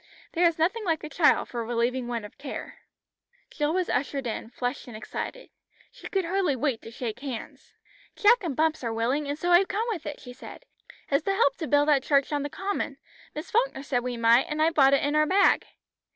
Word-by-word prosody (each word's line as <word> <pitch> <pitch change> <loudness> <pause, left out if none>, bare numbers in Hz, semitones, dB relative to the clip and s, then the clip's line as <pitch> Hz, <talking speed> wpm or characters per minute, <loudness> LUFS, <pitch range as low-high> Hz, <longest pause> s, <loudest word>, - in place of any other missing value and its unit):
There 345 0 +4
is 335 - -1
nothing 375 +8 +1
like 330 -5 -1
a 305 - -5
child 310 +1 +3
for 235 -1 -3
relieving 240 +2 -1
one 235 -3 -3
of 210 - -14
care." 275 -1 -7 0.7
Jill 295 -1 0
was 365 +1 0
ushered 275 0 -1
in, 225 -1 -4
flushed 245 +1 -4
and 235 -3 -8
excited. - - -6 0.4
She - - -10
could 385 -3 0
hardly 355 -4 +1
wait 260 -3 -1
to - - -10
shake 230 -1 -5
hands. 265 -4 -8 0.4
"Jack 470 +1 +4
and 320 -7 -2
Bumps 315 -1 +1
are 230 - -1
willing, 250 +6 0
and 290 - -2
so 350 +3 -1
I've 360 +2 +6
come 430 +3 -1
with 355 -8 -4
it," 295 - -6
she 250 - -10
said. 260 - -11 0.5
"It's 280 +2 +2
to 390 - +1
help 470 +4 +3
to 320 - -4
build 290 0 +3
that 290 -3 +4
church 280 +1 +2
on 290 - 0
the 290 - -3
common. 390 +6 -3 0.4
Miss 305 - -6
Falkner 465 - +1
said 255 -3 0
we 250 -1 -3
might, 230 +2 +4
and 300 0 -3
I've 320 +1 +3
brought 275 -2 +6
it - - 0
in 290 +1 0
our 305 0 +4
bag." 385 +3 +4
290 Hz, 225 wpm, -27 LUFS, 250-345 Hz, 0.7 s, I've